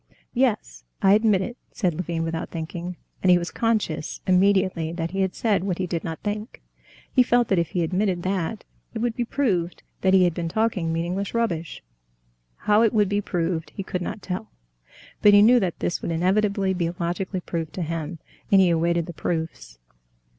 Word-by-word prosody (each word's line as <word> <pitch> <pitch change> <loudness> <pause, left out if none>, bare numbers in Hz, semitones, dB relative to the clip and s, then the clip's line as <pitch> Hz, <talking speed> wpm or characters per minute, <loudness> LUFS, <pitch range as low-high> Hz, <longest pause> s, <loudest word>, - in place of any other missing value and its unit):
"Yes, 215 - 0 0.2
I 195 0 +6
admit 210 -3 +4
it," 240 +5 -6
said 180 -5 0
Levin 165 0 -3
without 165 0 -3
thinking, 170 +2 -5 0.2
and 185 - +2
he 180 - +7
was 175 0 -3
conscious 215 -10 -1
immediately 185 -3 +2
that 165 -1 -3
he 195 +1 -1
had 190 -1 0
said 210 -5 +1
what 185 -3 -1
he 185 - -1
did 170 -2 -3
not 165 -1 -6
think. 210 +2 -4 0.5
He 255 - +6
felt 245 -1 +3
that 190 - +3
if 170 - 0
he 175 - 0
admitted 185 +1 0
that, 190 +2 -2 0.3
it - - -1
would 230 0 -1
be 245 - 0
proved 190 -11 -1 0.2
that 190 0 +4
he 185 - +6
had 175 -2 +2
been 170 -1 -3
talking 200 -5 0
meaningless 175 +6 -2
rubbish. 170 -9 -2 0.8
How 210 +1 +5
it 225 -2 +3
would 210 -3 +3
be 205 0 +1
proved 170 -3 -2
he 195 - -4
could 180 -1 -4
not 195 +3 -5
tell, 180 - -4 0.7
but 205 -1 +7
he 205 - +8
knew 245 +3 +6
that 185 -6 -2
this - - -1
would - - -3
inevitably 195 +3 +1
be 175 -2 -1
logically 180 +2 -2
proved 165 -2 -4
to 180 - -3
him, 165 0 -4 0.3
and 195 - +7
he 185 -2 +5
awaited 170 0 +1
the 175 - -8
proofs. 160 - -4
185 Hz, 195 wpm, -24 LUFS, 170-205 Hz, 0.8 s, he